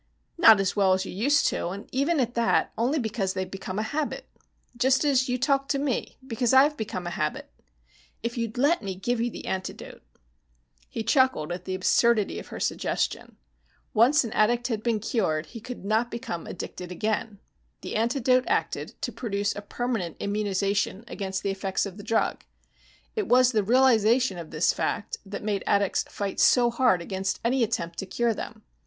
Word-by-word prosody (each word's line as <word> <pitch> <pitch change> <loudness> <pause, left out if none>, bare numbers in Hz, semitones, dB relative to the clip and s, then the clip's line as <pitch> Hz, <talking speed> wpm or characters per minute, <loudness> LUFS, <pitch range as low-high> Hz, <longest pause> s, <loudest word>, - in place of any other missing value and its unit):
"Not 225 - +7
as 195 -1 0
well 195 -2 +4
as 190 +1 0
you - - -6
used 280 - +2
to, - - -2
and 195 +4 -6
even 285 +5 +1
at 240 -2 0
that, 235 -1 +2
only 250 +7 +1
because 215 -6 -2
they've 185 -1 -3
become 190 0 -6
a 215 - 0
habit. 290 +7 -3 0.5
Just 260 +4 +2
as 265 -2 +2
you 250 - +1
talk 275 +1 +1
to 280 - +1
me, 275 -3 -2
because 245 0 +1
I've 290 +3 +6
become 195 -6 -5
a 175 - -3
habit. 155 -2 -3 0.7
If 235 0 -2
you'd 230 -1 -3
let 290 +7 +3
me 195 -3 -4
give 235 +5 -1
you 240 - +1
the - - -9
antidote 190 0 -5 0.5
" - - -37
He 225 - -4
chuckled 245 - +2
at 175 - -5
the 185 - -2
absurdity 215 +3 +2
of - - -10
her - - -8
suggestion. - - -2 0.6
Once 255 +7 +5
an 230 - -5
addict 240 +3 +2
had 220 -3 -2
been 230 -1 0
cured, 190 -8 -1
he 230 +9 -10
could 245 -3 -8
not 220 +3 +1
become 230 -9 -5
addicted 180 0 -7
again. 215 +2 -2 0.4
The - - -6
antidote 250 +3 +2
acted - - -2
to - - -1
produce 205 -3 -2
a 205 - -5
permanent 210 -5 -3
immunization 200 0 -1
against 190 -3 -4
the 200 - 0
effects 195 0 -1
of 195 -1 -8
the 205 - -9
drug. 225 - 0 0.7
It 430 -3 -1
was 250 0 +5
the 220 -3 +2
realization 235 -2 +3
of 165 -2 -8
this 155 +1 +2
fact 205 - -3
that 200 +1 -6
made 205 -2 -1
addicts 200 -1 +2
fight 200 -1 -4
so 240 -2 +5
hard 235 -8 +2
against 190 +1 -3
any 255 +2 +2
attempt 170 -6 -2
to 195 - -4
cure 235 +4 0
them. 215 0 -8
220 Hz, 185 wpm, -26 LUFS, 195-250 Hz, 0.7 s, Not